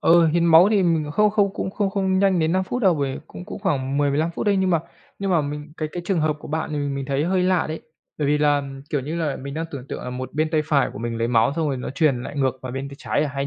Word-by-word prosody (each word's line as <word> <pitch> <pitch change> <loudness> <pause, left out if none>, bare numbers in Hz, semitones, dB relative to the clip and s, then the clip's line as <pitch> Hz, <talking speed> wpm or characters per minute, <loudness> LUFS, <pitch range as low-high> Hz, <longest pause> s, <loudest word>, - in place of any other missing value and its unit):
ừ, 170 0 +5
hiến 170 +2 +2
máu 165 +4 +7
thì 205 -3 +3
mình 160 -4 +1
không 210 +5 +3
không 200 -2 +2
cũng 190 - -3
không 200 -1 -1
không 190 -1 +1
nhanh 195 -2 +3
đến 160 0 +1
5 190 +1 +1
phút 245 +6 -3
đâu. 185 -3 +5
Vì 140 -1 -2
cũng 180 - -10
cũng - - -7
khoảng 140 -8 -1
10-15 145 +3 +1
phút 170 - -4
đấy, 200 -1 +3
nhưng 190 -1 +2
mà 165 -3 +3 0.4
nhưng 195 -1 -2
mà 170 - +4
mình 150 +1 -5
cái 155 - -3
cái 175 - -4
trường 185 -5 +1
hợp 155 -1 +1
của - - -10
bạn 155 0 -2
mình 145 -1 -2
mình 135 -1 -3
thấy 140 +2 0
hơi 185 +1 +1
lạ 185 -2 +2
đấy. 160 +1 -5 0.4
Bởi 150 - 0
vì 150 +1 +2
là, 145 -1 +3
ừm, 135 -1 -7
kiểu 145 - 0
như 150 +6 -4
là, 155 -5 -1
mình 140 +2 -7
đang 160 - -2
tưởng 135 -3 -7
tượng - - -5
là 125 - -5
một 130 0 -6
bên 155 +1 0
tay 155 -2 +2
phải 145 -3 +2
của - - -8
mình 115 0 -3
lấy 115 +1 0
máu 115 +2 +3
xong 160 -2 0
rồi 135 - -1
nó 125 - -5
truyền 135 -3 +1
lại 145 - -7
ngược 130 -1 0
vào 125 -1 -5
bên 135 +1 -4
tay 140 - -10
trái 145 - 0
à, 145 - -3
hay 140 0 -1
155 Hz, 315 wpm, -23 LUFS, 140-175 Hz, 0.4 s, máu